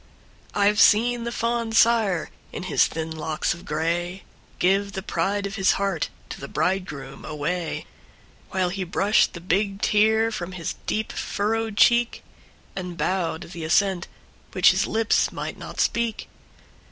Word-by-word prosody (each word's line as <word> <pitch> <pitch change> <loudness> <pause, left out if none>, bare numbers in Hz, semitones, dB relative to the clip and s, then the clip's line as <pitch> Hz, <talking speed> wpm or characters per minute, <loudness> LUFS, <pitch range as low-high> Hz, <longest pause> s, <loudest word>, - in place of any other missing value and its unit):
I 200 -1 +4
've 210 - -2
seen 235 +2 +4
the 235 - -2
fond 230 -1 -1
sire, 220 -8 +3 0.2
in - - -6
his 185 - +3
thin 160 0 -5
locks 160 0 -1
of 175 +2 -12
gray, 170 +4 -2 0.3
Give 195 +2 +2
the 190 - -4
pride 200 0 -1
of 200 +1 -5
his 195 -1 +4
heart 195 -5 -1 0.2
to - - -7
the 140 - -6
bridegroom 160 -7 -2
away; 165 +3 -3 0.6
While 185 -1 0
he 190 +1 -3
brushed 195 +4 +2
the 170 - -7
big 195 +3 0
tear 220 +2 +3
from 185 -4 -5
his 170 -3 -4
deep 220 0 -1
furrowed 220 +1 -2
cheek, 240 0 +4 0.5
And 180 -2 -5
bowed 175 -3 -1
the 170 -3 -7
assent 185 +2 +2 0.5
which - - +6
his - - 0
lips 225 0 +2
might - - -5
not - - -8
speak. 235 -1 0
195 Hz, 155 wpm, -24 LUFS, 175-220 Hz, 0.6 s, which